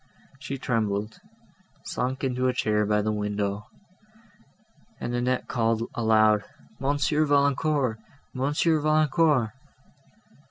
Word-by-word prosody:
She 135 Hz, 0 st, -5 dB
trembled, 110 Hz, -4 st, -2 dB, 0.7 s
sunk 130 Hz, +2 st, -3 dB
into 130 Hz, -1 st, 0 dB
a 125 Hz, -, +1 dB
chair 105 Hz, -2 st, +1 dB
by 105 Hz, 0 st, +2 dB
the 110 Hz, -, 0 dB
window, 105 Hz, 0 st, -2 dB, 1.3 s
and 120 Hz, -, -4 dB
Annette 125 Hz, +1 st, -1 dB
called 115 Hz, -1 st, 0 dB
aloud, 110 Hz, -2 st, +3 dB, 0.4 s
"Monsieur 145 Hz, +2 st, +1 dB
Valancourt! 140 Hz, -4 st, +1 dB, 0.3 s
Monsieur 150 Hz, +4 st, +1 dB
Valancourt!" 155 Hz, -5 st, +2 dB
125 Hz, 95 wpm, -26 LUFS, 110-140 Hz, 1.3 s, aloud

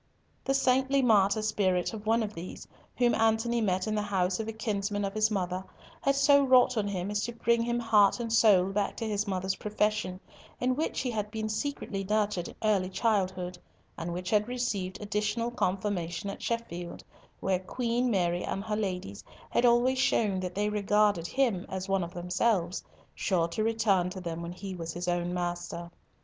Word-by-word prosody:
The 270 Hz, -, +1 dB
saintly 265 Hz, +1 st, +3 dB
martyr 215 Hz, -2 st, +4 dB
spirit 190 Hz, -3 st, +1 dB
of 215 Hz, -1 st, -7 dB
one 225 Hz, +1 st, +3 dB
of 210 Hz, -1 st, -4 dB
these, 175 Hz, 0 st, -8 dB, 0.3 s
whom 240 Hz, -1 st, +3 dB
Antony 225 Hz, +1 st, +2 dB
met 185 Hz, -3 st, +1 dB
in 215 Hz, -, -1 dB
the 210 Hz, -, 0 dB
house 190 Hz, -2 st, 0 dB
of 220 Hz, -, -3 dB
a -, -, -2 dB
kinsman 205 Hz, -2 st, -2 dB
of 195 Hz, -, -3 dB
his 215 Hz, 0 st, +2 dB
mother, 185 Hz, -3 st, -2 dB, 0.4 s
had 275 Hz, 0 st, +2 dB
so 280 Hz, +1 st, +5 dB
wrought 255 Hz, -1 st, +5 dB
on 210 Hz, -2 st, 0 dB
him 195 Hz, 0 st, -3 dB
as 205 Hz, 0 st, 0 dB
to 235 Hz, -, -5 dB
bring 235 Hz, 0 st, +2 dB
him 235 Hz, +1 st, 0 dB
heart 215 Hz, -2 st, +4 dB
and 230 Hz, -1 st, -2 dB
soul 195 Hz, -5 st, +5 dB
back 200 Hz, 0 st, -1 dB
to 230 Hz, -, -3 dB
his 210 Hz, 0 st, -1 dB
mother's 190 Hz, 0 st, -1 dB
profession, 210 Hz, -3 st, -1 dB, 0.4 s
in 255 Hz, +1 st, +1 dB
which 310 Hz, +4 st, -1 dB
he 250 Hz, -, -2 dB
had 210 Hz, -2 st, -2 dB
been 220 Hz, 0 st, -3 dB
secretly 215 Hz, -4 st, -3 dB
nurtured 205 Hz, -3 st, 0 dB
in -, -, -10 dB
early 200 Hz, -4 st, +2 dB
childhood, 185 Hz, -3 st, -1 dB, 0.4 s
and 165 Hz, +1 st, -4 dB
which 180 Hz, +1 st, -4 dB
had 210 Hz, 0 st, +3 dB
received 215 Hz, -7 st, -2 dB
additional 210 Hz, +3 st, -1 dB
confirmation 190 Hz, -3 st, -2 dB
at -, -, -9 dB
Sheffield, 175 Hz, -7 st, -4 dB, 0.4 s
where 190 Hz, -1 st, +1 dB
Queen 240 Hz, +5 st, -1 dB
Mary 175 Hz, -4 st, +1 dB
and 195 Hz, -, -3 dB
her 215 Hz, 0 st, -2 dB
ladies 180 Hz, -, -3 dB, 0.3 s
had 245 Hz, -, +4 dB
always 245 Hz, +2 st, +3 dB
shown 210 Hz, -6 st, +2 dB
that 180 Hz, -1 st, -4 dB
they 205 Hz, +1 st, +1 dB
regarded 210 Hz, -3 st, +2 dB
him 235 Hz, -8 st, +1 dB
as 190 Hz, 0 st, -4 dB
one 195 Hz, -1 st, +1 dB
of 170 Hz, +1 st, -7 dB
themselves, 180 Hz, +1 st, 0 dB, 0.3 s
sure 175 Hz, -4 st, +1 dB
to 215 Hz, +6 st, -2 dB
return 210 Hz, -5 st, +2 dB
to 185 Hz, +1 st, -7 dB
them 170 Hz, -2 st, -5 dB
when 170 Hz, +1 st, -5 dB
he 190 Hz, +1 st, -7 dB
was 165 Hz, -2 st, -5 dB
his 175 Hz, +1 st, -5 dB
own 175 Hz, 0 st, 0 dB
master. 175 Hz, -1 st, -4 dB
205 Hz, 190 wpm, -29 LUFS, 185-225 Hz, 0.4 s, so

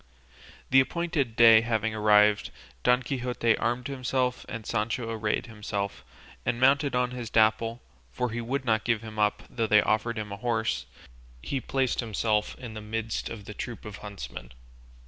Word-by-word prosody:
The 135 Hz, -, +7 dB
appointed 145 Hz, -4 st, 0 dB
day 115 Hz, -1 st, +8 dB
having 110 Hz, -1 st, -1 dB
arrived, 105 Hz, -1 st, +4 dB, 0.3 s
Don 125 Hz, +1 st, +3 dB
Quixote 125 Hz, -3 st, 0 dB
armed 120 Hz, +1 st, -1 dB
himself, 130 Hz, -1 st, -1 dB
and 115 Hz, -3 st, -6 dB
Sancho 115 Hz, +3 st, -2 dB
arrayed 110 Hz, +2 st, -1 dB
himself, 105 Hz, -3 st, -4 dB, 0.4 s
and 120 Hz, -1 st, -1 dB
mounted 135 Hz, +1 st, +3 dB
on 125 Hz, 0 st, +1 dB
his 120 Hz, -3 st, -5 dB
Dapple 115 Hz, +2 st, +2 dB, 0.3 s
(for 125 Hz, -, -2 dB
he 120 Hz, +1 st, -3 dB
would 130 Hz, +3 st, -2 dB
not 110 Hz, -2 st, +2 dB
give 115 Hz, -2 st, 0 dB
him 110 Hz, -1 st, -7 dB
up 105 Hz, 0 st, +1 dB
though 115 Hz, -2 st, -2 dB
they 105 Hz, 0 st, +5 dB
offered 115 Hz, +2 st, 0 dB
him 105 Hz, -2 st, -4 dB
a 100 Hz, -, -5 dB
horse), 110 Hz, -, -1 dB, 0.6 s
he 135 Hz, -, -2 dB
placed 130 Hz, +1 st, 0 dB
himself 110 Hz, -2 st, 0 dB
in 120 Hz, -3 st, -8 dB
the 110 Hz, -, -7 dB
midst 110 Hz, +1 st, -3 dB
of 105 Hz, -3 st, -8 dB
the 105 Hz, -, -7 dB
troop 120 Hz, +3 st, -6 dB
of 105 Hz, -1 st, -7 dB
huntsmen. 95 Hz, -12 st, -8 dB
115 Hz, 165 wpm, -28 LUFS, 105-125 Hz, 0.6 s, day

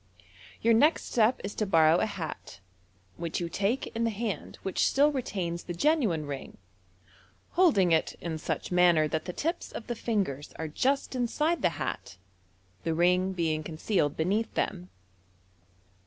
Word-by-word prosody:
Your 230 Hz, +1 st, +5 dB
next 295 Hz, +9 st, +3 dB
step 230 Hz, +1 st, +3 dB
19 200 Hz, -, -6 dB
to 215 Hz, -, +1 dB
borrow 160 Hz, -2 st, +5 dB
a 220 Hz, -, +1 dB
hat. 160 Hz, -, -7 dB, 0.6 s
which 170 Hz, -1 st, -3 dB
you 170 Hz, -1 st, -3 dB
take 200 Hz, +9 st, 0 dB
in 230 Hz, -, 0 dB
the 230 Hz, -, +2 dB
hand 220 Hz, -1 st, -4 dB
which 190 Hz, -, +1 dB
still 290 Hz, +2 st, +4 dB
retains 185 Hz, -11 st, -3 dB
the 175 Hz, -, -5 dB
genuine 220 Hz, -, +2 dB
ring 140 Hz, -2 st, -7 dB, 0.9 s
holding 280 Hz, -, +4 dB
it 160 Hz, -, +2 dB
in 160 Hz, -2 st, -4 dB
such -, -, -3 dB
manner 175 Hz, -3 st, +4 dB
that 155 Hz, +1 st, -2 dB
the 180 Hz, -, -3 dB
tips 330 Hz, -, -3 dB
of 220 Hz, -, -7 dB
the 240 Hz, -, -3 dB
fingers 195 Hz, -, -2 dB
are 160 Hz, -, -3 dB
just 270 Hz, -, 0 dB
inside 300 Hz, +7 st, 0 dB
the -, -, +3 dB
hat, -, -, -4 dB, 0.7 s
the 165 Hz, -1 st, -1 dB
ring 180 Hz, +2 st, +2 dB
being 160 Hz, -3 st, 0 dB
concealed 155 Hz, 0 st, -1 dB
beneath 200 Hz, +8 st, 0 dB
them. 180 Hz, -2 st, -2 dB
185 Hz, 155 wpm, -29 LUFS, 165-230 Hz, 0.9 s, Your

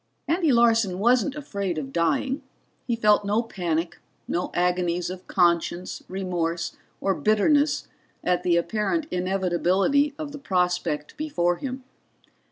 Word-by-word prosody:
Andy 330 Hz, -1 st, +2 dB
Larson 230 Hz, -6 st, +3 dB
wasn't 245 Hz, +6 st, +2 dB
afraid 200 Hz, -, -3 dB
of 135 Hz, -3 st, -5 dB
dying. 215 Hz, -, +1 dB, 0.5 s
He 240 Hz, -, +1 dB
felt 210 Hz, -2 st, +4 dB
no 210 Hz, +3 st, +1 dB
panic, 175 Hz, -6 st, -2 dB, 0.3 s
no 175 Hz, -, -1 dB
agonies 180 Hz, 0 st, 0 dB
of 185 Hz, 0 st, -9 dB
conscience, 175 Hz, 0 st, +1 dB
remorse 175 Hz, -3 st, -2 dB, 0.2 s
or 195 Hz, -, +1 dB
bitterness 285 Hz, +10 st, +2 dB, 0.4 s
at 180 Hz, 0 st, +1 dB
the 175 Hz, -1 st, +2 dB
apparent 215 Hz, -, 0 dB
inevitability 190 Hz, +10 st, +1 dB
of 305 Hz, -2 st, -5 dB
the 290 Hz, -, -8 dB
prospect 180 Hz, -, -1 dB
before 175 Hz, -, 0 dB
him. 260 Hz, +2 st, -5 dB
190 Hz, 125 wpm, -25 LUFS, 175-245 Hz, 0.5 s, felt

